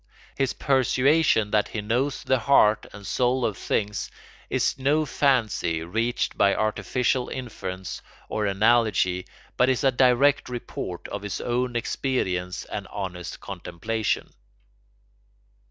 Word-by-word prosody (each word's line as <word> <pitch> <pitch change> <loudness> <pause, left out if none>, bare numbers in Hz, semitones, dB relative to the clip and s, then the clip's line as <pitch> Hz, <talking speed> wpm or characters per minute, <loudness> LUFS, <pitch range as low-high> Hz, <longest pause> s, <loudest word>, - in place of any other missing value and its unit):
His 135 -2 0
persuasion 130 -3 +3
that 105 -1 +2
he 110 - -4
knows 125 +6 -1
the 130 -1 +2
heart 110 -3 +4
and 100 0 -11
soul 125 +5 +1
of 105 - -1
things 105 +2 -2 0.4
is - - +1
no 150 +4 +2
fancy 110 - +1
reached 115 +8 -1
by 100 0 +3
artificial 125 +4 0
inference 95 -7 -6 0.3
or 105 -1 -1
analogy 100 -3 +2 0.3
but 125 - +4
is 130 +2 +1
a 135 - +5
direct 130 +3 +3
report 115 -7 -6
of 100 - -5
his 105 -1 -4
own 125 0 -1
experience 95 -8 -1
and - - -6
honest 90 -3 -6
contemplation. 110 +5 -3
115 Hz, 120 wpm, -25 LUFS, 100-130 Hz, 0.4 s, a